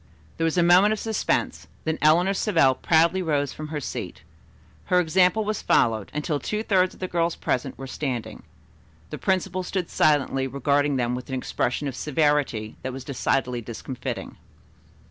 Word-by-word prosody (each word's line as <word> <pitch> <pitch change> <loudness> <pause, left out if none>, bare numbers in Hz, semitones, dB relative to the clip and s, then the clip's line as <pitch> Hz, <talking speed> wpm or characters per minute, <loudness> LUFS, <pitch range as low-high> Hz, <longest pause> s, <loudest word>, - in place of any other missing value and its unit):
There 165 - 0
was 165 +2 0
a 175 - +4
moment 180 +5 +6
of 215 - -4
suspense, 85 - -1 0.2
then 160 0 -2
Eleanor 170 +6 +4
Savell 165 -10 +3
proudly 170 +6 +2
rose 145 -5 0
from 155 - -7
her 150 -1 -4
seat. 140 - -6 0.6
Her 180 - +3
example 180 +5 +3
was 215 0 -2
followed, 110 -3 +2
until 150 0 -2
two 215 +7 -3
thirds 185 -4 +2
of - - -19
the 185 - -3
girls 170 -1 0
present 130 +1 -2
were 135 - -7
standing. 130 -3 -4 0.7
The - - -6
principal 190 -1 0
stood 180 -1 -3
silently 135 -3 +2
regarding 140 +2 +1
them 125 -1 0
with 125 +2 -6
an 130 - -2
expression 125 +2 -2
of 135 - -4
severity 145 -7 0
that 130 - -4
was 135 0 -7
decidedly 125 -2 -1
discomfitting. 120 +3 -6
150 Hz, 165 wpm, -24 LUFS, 130-180 Hz, 0.7 s, moment